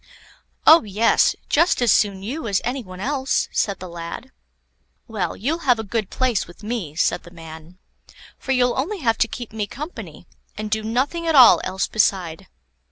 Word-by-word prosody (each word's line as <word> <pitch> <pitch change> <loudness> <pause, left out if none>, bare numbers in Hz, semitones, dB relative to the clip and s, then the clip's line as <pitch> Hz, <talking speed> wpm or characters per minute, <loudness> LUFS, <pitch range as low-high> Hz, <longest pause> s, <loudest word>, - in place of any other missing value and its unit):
"Oh, 320 +2 +8
yes; 215 +2 +2
just 335 +5 +2
as 240 -4 +3
soon 195 -2 +1
you 270 +7 -5
as 200 -3 +1
any 255 +3 -2
one 185 -2 -11
else," 265 +4 -1
said 200 -2 -1
the 185 - -8
lad. 170 +9 -8 0.8
"Well, 205 -7 -3
you'll 290 - -2
have 245 - +5
a 220 - -4
good 215 -1 -3
place 255 -5 -1
with 175 +4 -16
me," 210 -9 -4
said - - +1
the - - -14
man; 165 0 -12 0.6
"for 270 - -4
you'll 250 -1 +2
only 380 +10 -2
have 230 -4 +1
to - - +3
keep 235 -2 -8
me 210 -2 -3
company, 300 - -9 0.3
and 215 0 -5
do 220 +1 0
nothing 265 +10 -2
at 325 - +2
all 255 -3 +8
else 190 +1 -2
beside." 190 -4 0
220 Hz, 180 wpm, -21 LUFS, 190-255 Hz, 0.8 s, Oh